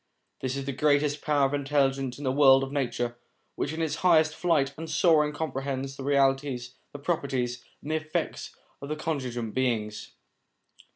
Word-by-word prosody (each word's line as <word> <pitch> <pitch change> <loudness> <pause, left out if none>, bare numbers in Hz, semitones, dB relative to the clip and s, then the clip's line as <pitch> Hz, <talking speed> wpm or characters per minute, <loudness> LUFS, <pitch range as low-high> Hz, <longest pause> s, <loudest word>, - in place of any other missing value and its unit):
This 130 0 -2
is 135 - -4
the 140 - -2
greatest 145 +1 +2
power 145 -2 +2
of 135 - -1
intelligence 135 -2 0
in 145 - -8
the 130 - +1
world 135 -1 +6
of 135 - -5
nature, 120 -4 -2 0.4
which 145 - -2
in 160 +1 -2
its 160 - -1
highest 160 -3 +4
flight 145 -6 +1
and 160 +2 -7
soaring 155 -4 +4
comprehends 135 -3 -3
the 135 - -7
realities, 135 -2 +1 0.2
the - - -7
properties, 135 -6 -2 0.2
and 150 - -4
the 155 - +2
effects 155 0 -4 0.3
of 140 - -7
the 155 - -1
contingent 130 -8 -3
beings. 110 -5 -2
140 Hz, 170 wpm, -27 LUFS, 130-150 Hz, 0.4 s, world